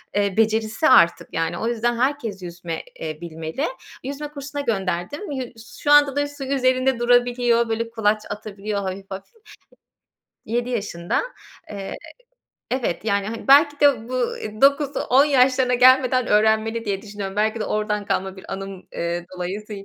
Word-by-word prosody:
eee, 200 -1 0
becerisi 220 +5 +2
artık, 170 -10 +5
yani. 165 +1 -1
O 225 - -2
yüzden 240 0 0
herkes 245 -6 -1
yüzme, 170 -2 -6 0.2
eee, 155 -1 -6
bilmeli. 165 - -4 0.4
Yüzme 285 +3 -5
kursuna 285 0 -6
gönderdim. 205 - -3
Yu 265 -2 -2 0.4
şu 290 - +1
anda 290 -2 +6
da 290 0 +1
su 290 -1 -9
üzerinde 260 -1 +1
durabiliyor, 240 -1 +3
böyle, 230 +1 -2
kulaç 215 -2 +1
atabiliyor 205 0 -4
hafif 195 0 -6
hafif. 190 - -8 1.1
7 240 +3 -2
yaşında. 200 -7 -2 0.5
Eee, 200 -2 -6 0.8
evet, 240 -9 -2
yani, 200 -2 0
hani, 225 +4 -6
belki 290 +1 +6
de 265 -6 +3
bu 255 -1 0 0.3
9-10 280 -1 +4
yaşlarına 255 -3 +3
gelmeden 255 0 +5
öğrenmeli 220 +2 +2
diye 200 -2 -2
düşünüyorum. 205 -2 -6
Belki 220 +2 +1
de - - -1
oradan 210 -1 -1
kalma 190 0 -2
bir 190 - -9
anım, 195 0 -5 0.3
ııı, 170 0 -2
dolayısıyla. 195 +3 -5
225 Hz, 145 wpm, -22 LUFS, 200-255 Hz, 1.1 s, anda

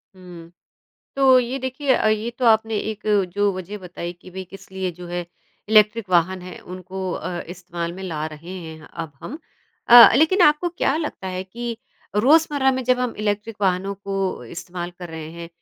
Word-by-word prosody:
हुँ, 175 -2 -12 0.7
तो 265 -2 +6
ये 250 +2 -1
देखिए 260 +1 0
अ, - - +1
ये 215 +2 0
तो 255 - -1
आपने 220 -1 +3
एक 215 -1 -8 0.3
जो 205 0 +2
वज़ह 185 +3 -6
बताई 175 -1 -7
कि 185 - -13
भई 190 +1 -6
किस 195 -1 -13
लिए 190 -1 -2
जो 175 +1 -10
है 175 0 -4 0.4
इलेक्ट्रिक 215 0 +4
वाहन 180 +1 +2
है 180 -1 -9
उनको 185 +1 -6
अ, 175 -1 -4
इस्तेमाल 175 -1 -5
में 190 - -9
ला 155 -5 -3
रहे 160 +3 -10
हैं 160 -2 -10
अब 160 -3 -6
हम 295 - -7 0.5
अ, 240 0 +11
लेकिन 345 +6 +4
आपको 300 +3 +4
क्या 310 -4 0
लगता 295 - -4
है 185 0 -3
कि 235 +4 -5 0.4
रोजमर्रा 285 +3 +4
में 260 0 -2
जब 250 0 +2
हम 250 -2 -1
इलेक्ट्रिक 210 +1 -2
वाहनों 195 +1 0
को 195 -6 -3
इस्तेमाल 175 +6 -6
कर 175 - -7
रहे 160 -1 -7
हैं 170 0 -8
190 Hz, 185 wpm, -22 LUFS, 175-235 Hz, 0.7 s, अ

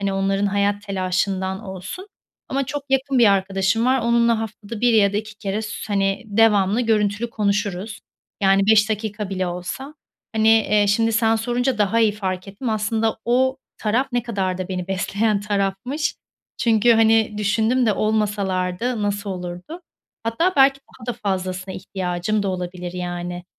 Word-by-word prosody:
hani, 200 -1 -1
onların 195 +1 +1
hayat 205 0 0
telaşından 190 0 -1
olsun 190 - -7 0.4
ama 275 +1 -1
çok 290 0 -4
yakın 270 0 +1
bir 235 - +6
arkadaşım 195 +3 +1
var. 260 +1 +3
Onunla 235 -1 +2
haftada 215 0 -7
1 245 -1 +4
ya 200 -2 +4
da - - -1
2 215 0 -4
kere 210 0 -3
s 220 - -5 0.2
hani, 195 -1 +1
devamlı 210 0 +3
görüntülü 220 0 +1
konuşuruz. 205 -1 -2 0.4
Yani, 195 +1 +4
5 215 0 +5
dakika 210 -1 -3
bile 185 -1 -1
olsa, 180 - -5 0.4
hani, 220 0 +3
eee, 210 -2 +4
şimdi 225 +3 +2
sen 225 0 +3
sorunca 245 +2 -1
daha 210 +2 +2
iyi 220 -2 +4
fark 190 -2 -4
ettim. 215 +5 -5
Aslında 220 +1 0
o 260 +3 +2 0.2
taraf 230 +5 +1
ne 245 - +1
kadar 195 -6 -2
da 185 0 -4
beni 180 -1 -4
besleyen 200 +2 0
tarafmış. 205 +8 -1 0.4
Çünkü, 230 0 +4
hani, 225 -1 +4
düşündüm 220 +4 +2
de 215 - +4
olmasalardı, 210 +1 -1
nasıl 205 0 -2
olurdu? 180 - -6 0.4
Hatta 230 +12 +1
belki 275 0 +5
daha 255 -3 -16
da - - -22
fazlasına 185 -1 -3
ihtiyacım 185 +2 -2
da 195 - -1
olabilir 180 -1 -4
yani. 175 0 -5
210 Hz, 160 wpm, -22 LUFS, 195-225 Hz, 0.4 s, bir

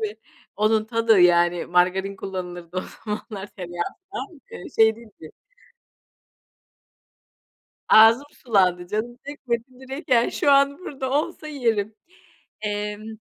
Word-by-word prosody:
Tabii, 215 - 0
tabii, 220 - -47 0.4
onun 215 +1 +2
tadı 225 -3 +3
yani; 175 0 +4
margarin 185 +3 +1
kullanılırdı 180 -2 -7
o - - +1 0.2
zamanlar, 210 -2 -5
tereyağı 175 -3 -5 0.3
falan, 375 -6 -7
eee, - - -9
şey 220 0 +5
değildi. 215 -9 -14 2.6
Ağzım 225 +5 +7
sulandı, 185 -6 +1
canım 235 +5 -3
çekmedi. 250 -5 -3 0.2
Direkt 265 +4 -8
yani, 240 -2 +3
şu 285 - +2
an 280 0 +4
burada 270 -7 -5
olsa 310 +2 -1
yerim. 225 -7 -1 0.7
Emm 210 +1 -4
215 Hz, 115 wpm, -23 LUFS, 185-245 Hz, 2.6 s, Ağzım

